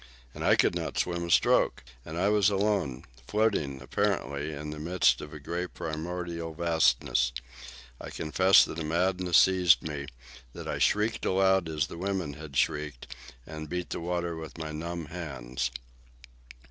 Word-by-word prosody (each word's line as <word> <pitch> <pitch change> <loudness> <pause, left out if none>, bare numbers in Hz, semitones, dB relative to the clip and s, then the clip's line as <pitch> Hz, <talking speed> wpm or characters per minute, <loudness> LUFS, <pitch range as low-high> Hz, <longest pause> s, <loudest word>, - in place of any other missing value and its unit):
And - - -6
I - - +5
could - - +3
not - - -4
swim 85 -1 -1
a - - -6
stroke. - - +3 0.2
And 80 +4 -7
I 95 +3 +2
was 105 -2 +4
alone, 100 -10 0 0.2
floating, 100 -11 0
apparently, 80 -4 -1
in 75 0 -6
the 75 - -7
midst 85 +4 +2
of 75 - -8
a 75 - -8
grey 85 +5 -3
primordial 85 0 -5
vastness. 80 -6 +2 0.7
I - - -7
confess 95 +4 +4
that 80 - -6
a - - -2
madness 90 +2 +2
seized 90 -2 +5
me, 70 -2 -5 0.5
that - - -8
I - - -2
shrieked 105 +2 +1
aloud 95 -2 +3
as 75 -2 0
the 85 - -9
women 95 -5 -2
had 75 -2 -8
shrieked, 75 -4 -1 0.3
and 80 -1 -8
beat 90 +1 -4
the - - -2
water 85 0 -2
with 80 0 -8
my 80 -1 -5
numb 85 +2 -5
hands. 65 -7 -4
85 Hz, 160 wpm, -28 LUFS, 75-90 Hz, 0.7 s, I